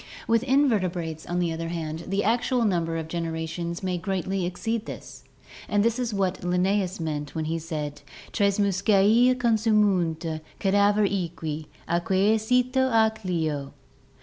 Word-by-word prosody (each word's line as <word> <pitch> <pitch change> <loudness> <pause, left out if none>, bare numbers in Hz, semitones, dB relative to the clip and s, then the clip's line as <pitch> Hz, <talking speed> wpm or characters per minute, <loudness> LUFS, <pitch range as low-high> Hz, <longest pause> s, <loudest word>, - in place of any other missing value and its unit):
With 230 -1 +3
invertebrates, 185 - 0
on 175 - -2
the 175 -2 0
other 165 +1 -4
hand, 165 -1 -4
the 195 +2 0
actual 240 +2 +1
number 170 -5 0
of 160 -1 -4
genera 165 -1 -3
tions 170 +2 -5
may 180 -1 -1
greatly 190 -1 -2
exceed 225 +5 -3
this, - - -9 0.5
and 205 +1 +2
this 230 +2 +1
is 245 -2 -1
what 190 -2 -1
Linnaeus 185 +1 0
meant 150 -2 -4
when 160 -1 -2
he 165 +1 -2
said: 150 -3 -5 0.3
"Tres 200 -2 +1
muscae 205 +5 +4
consumunt 205 -9 +1 0.2
cadaver 205 +1 +3
equi, 165 -5 -3 0.2
aeque 190 +5 +2
cito 250 +3 +2
ac 220 -1 +3
leo." 155 -5 -2
185 Hz, 145 wpm, -26 LUFS, 165-215 Hz, 0.5 s, muscae